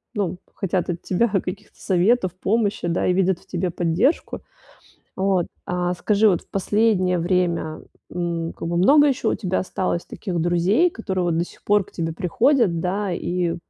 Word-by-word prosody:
ну, 185 -3 -1 0.2
хотят 185 -2 -1
от 170 -1 -3
тебя 215 +6 +1
каких-то 195 +1 -4
советов, 185 0 +2
помощи, 205 -1 0
да, 170 - 0
и 180 - +3
видят 185 -1 +1
в - - -24
тебе 180 0 -2
поддержку. 175 - 0 0.7
Вот, 190 -2 +1 0.2
а 180 0 -1
скажи, 210 +3 +2
вот 180 - +1
в - - -25
последнее 195 -2 +1
время, 170 -3 0 0.3
м, 170 -1 -2
как - - -6
бы 170 0 -1
много 290 +11 +6
ещё 270 -3 0
у - - 0
тебя 185 -3 -1
осталось 185 -2 -2
таких 180 -5 -4
друзей, 175 - +3
которые 190 - -3
вот 165 -2 0
до 170 - 0
сих - - -17
пор 205 -2 +2
к - - -19
тебе 165 -1 -3
приходят, 205 - +2
да, 195 +1 -1
и 175 0 -1
185 Hz, 175 wpm, -22 LUFS, 175-205 Hz, 0.7 s, много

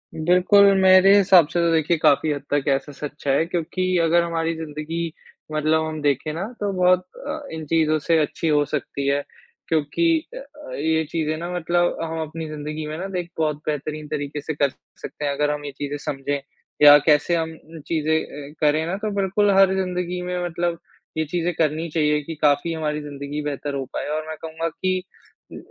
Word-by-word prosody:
बिल्कुल, 180 +5 +5 0.2
मेरे 190 +1 +7
हिसाब 185 -5 +6
से 170 +2 -2
तो 170 0 +2
देखिए, 165 +1 +2
काफ़ी 155 0 +3
हद 145 -2 -3
तक 145 -1 +2
ऐसा 140 +2 0
सच 145 +1 -8
है 140 +4 +3
क्योंकि 180 +2 -1
अगर 170 +1 +3
हमारी 165 -1 -1
ज़िंदगी 160 +2 -4 0.4
मतलब 155 +1 +1
हम 155 -1 -5
देखें 145 +1 0
ना, 170 +5 -3
तो 205 -1 -1
बहुत 185 0 +3 0.2
अ, 300 +2 -3
इन 160 -1 -5
चीज़ों 155 0 +2
से 165 +2 +2
अच्छी 155 +2 -1
हो 150 -1 +3
सकती 140 -1 -3
है 140 +1 +1 0.4
क्योंकि 160 - +1 0.3
अ - - -6
अ, 300 -13 -11
ये 160 +2 +1
चीज़ें 155 -1 -1
ना 170 +2 -5
मतलब 175 0 +1
हम 165 0 -3
अपनी 160 +1 -5
ज़िंदगी 155 +1 -5
में 155 +1 -5
ना 190 +3 -5
एक 175 -1 -7
बहुत 155 -2 0
बेहतरीन 150 0 -3
तरीके 145 -1 -4
से 155 - -4
कर 140 -1 +1 0.3
सकते 150 - -6
हैं 140 - +1
अगर 145 +1 0
हम 145 0 -4
ये 145 - -5
चीज़ें 145 0 -4
समझें। 140 0 -3 0.4
या 145 0 +10
कैसे 150 +2 +3
हम 160 -1 -2
अ, 160 0 -13
चीज़ें 160 -1 +1
अ, 145 0 -10
करें 155 +1 +3
ना, 175 +3 -2
तो 215 +1 -3
बिल्कुल 200 +1 +2
हर 195 -1 +6
ज़िंदगी 180 -1 -2
में 180 0 -3
मतलब 175 0 -2 0.4
ये 160 - +1
चीज़ें 175 +3 -1
करनी 160 +1 0
चाहिए 150 -1 +1
कि 165 +3 -6
काफ़ी 150 +2 +2
हमारी 150 -1 -2
ज़िंदगी 145 0 -6
बेहतर 145 0 -4
हो 135 -1 -3
पाए, - - -3
और 155 +1 -3
मैं 160 - -5
कहूँगा 165 0 -3
कि 185 +3 -1 0.5
अ, - - -8
160 Hz, 200 wpm, -22 LUFS, 150-175 Hz, 0.5 s, या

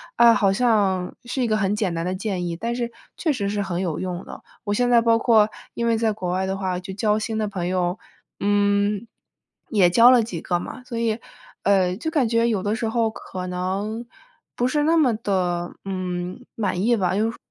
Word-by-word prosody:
啊， 235 0 +7
好 200 -3 +3
像 200 -5 +1
是 255 +2 -2
一 245 - +2
个 215 -1 +2
很 205 -1 +1
简 205 -5 -1
单 165 0 -2
的 185 +1 -1
建 190 -2 -3
议， 170 - -3
但 230 +7 -3
是 240 -1 -2 0.3
确 320 - +1
实 200 -6 -2
是 205 0 -1
很 175 -2 -2
有 170 -5 -2
用 180 -1 -4
的。 - - -10 0.2
我 205 - -1
现 245 +3 +2
在 240 -1 +6
包 230 0 +3
括 220 -3 +4 0.2
因 235 - -2
为 230 -1 +2
在 225 -1 +1
国 185 -4 -3
外 185 +1 0
的 190 0 -2
话 185 -2 -2
就 190 +1 -7
交 210 +1 +1
新 220 +1 -3
的 215 - 0
朋 180 -4 -3
友， 180 +1 0 0.4
嗯， 205 +1 +2 0.6
也 195 -5 +4
交 230 +7 +7
了 250 -2 +6
几 195 -7 -5
个 175 - 0
嘛， 255 - -7
所 240 -2 -5
以， 230 -1 0 0.4
呃， 190 -2 +3
就 320 - -3
感 295 -7 +2
觉 230 0 +2
有 210 -5 0
的 205 - 0
时 225 0 -2
候 225 0 +1
可 185 -4 -7
能 195 +6 -3 0.5
不 245 - 0
是 295 +3 +1
那 320 +2 +3
么 270 -7 +4
地， 215 -2 -4 0.5
嗯， 185 +3 -4
满 190 -5 -1
意 235 +4 +3
吧， 185 -4 0
因 210 - +2
为 - - +1
说 - - -13
205 Hz, 240 characters per minute, -23 LUFS, 185-230 Hz, 0.6 s, 啊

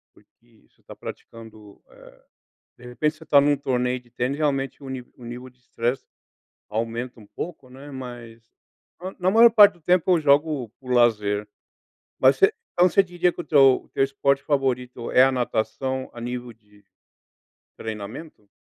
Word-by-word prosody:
porque 115 -2 -27
você - - -36
tá - - -12
praticando, 110 -3 -12
eh, - - -18 0.6
de 125 - -16
repente 150 +6 -1
você 160 - -14
tá 145 - +5
em 145 +1 +2
um - - +1
torneio 125 -2 -1
de 120 -1 -26
tênis 125 +3 -2
realmente 135 -2 -1
o 135 - -9
ni 130 -1 -5
o 125 - -14
nível 125 +2 -8
de 125 - -33
estresse 125 +1 -3 0.6
aumenta 115 +2 -4
um 105 - -15
pouco 155 - -8
não 130 +1 -14
é, 145 +1 -10
mas 120 -3 -9 0.8
na 185 +1 +2
maior 230 +2 +7
parte 205 -3 +7
do 175 - -23
tempo 180 +1 +2
eu - - -1
jogo 145 -4 +2
por 125 -1 -5
lazer. 105 -4 +2 0.7
Mas 130 +1 +5
você 195 - +4 0.2
então 180 +1 +4
você 195 +4 +4
diria 175 -1 0
que - - -8
o - - -6
teu 135 -3 +5
o - - -26
teu - - 0
esporte 140 0 0
favorito 125 -4 -2
é 130 - +6
a 135 - +2
natação 130 +2 -2
a 120 - -9
nível 120 0 -5
de 105 -2 -25 0.9
treinamento? 110 +2 -8
130 Hz, 175 wpm, -23 LUFS, 120-145 Hz, 0.9 s, maior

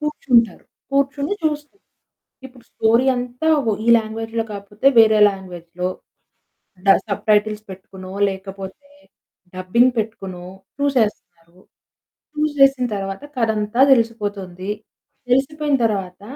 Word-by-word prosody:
కూర్చుంటారు. 250 - +1 0.3
కూర్చొని 280 +5 0
చూస్తు 300 +1 -2 0.7
ఇప్పుడు 250 -2 -19
స్టోరీ 230 +4 +2
అంతా 250 +5 -3 0.2
వా 220 - +2
ఈ - - -6
లాంగ్వేజ్‌లో 225 +1 -4
కాకపోతే 205 +4 -5
వేరే 220 -1 +6
లాంగ్వేజ్‌లో 180 -2 -6 1.0
డా 195 - +8 0.2
సబ్టైటిల్స్ 210 +1 +1
పెట్టుకునో, 190 0 -10 0.2
లేకపోతే 195 +6 -8 0.7
డబ్బింగ్ 235 +8 +3
పెట్టుకునో, 195 -5 -4 0.3
చూసే‌స్తునారు. 210 -10 -2 0.8
చూసేసిన 275 -4 +3
తరువాత 195 +5 -5
కథంతా 220 -1 -1
తెలిసిపోతుంది. 205 -6 -1 0.6
తెలిసిపోయిన 285 +3 +1
తరువాత 195 -4 -3
220 Hz, 90 wpm, -20 LUFS, 195-260 Hz, 1.0 s, డా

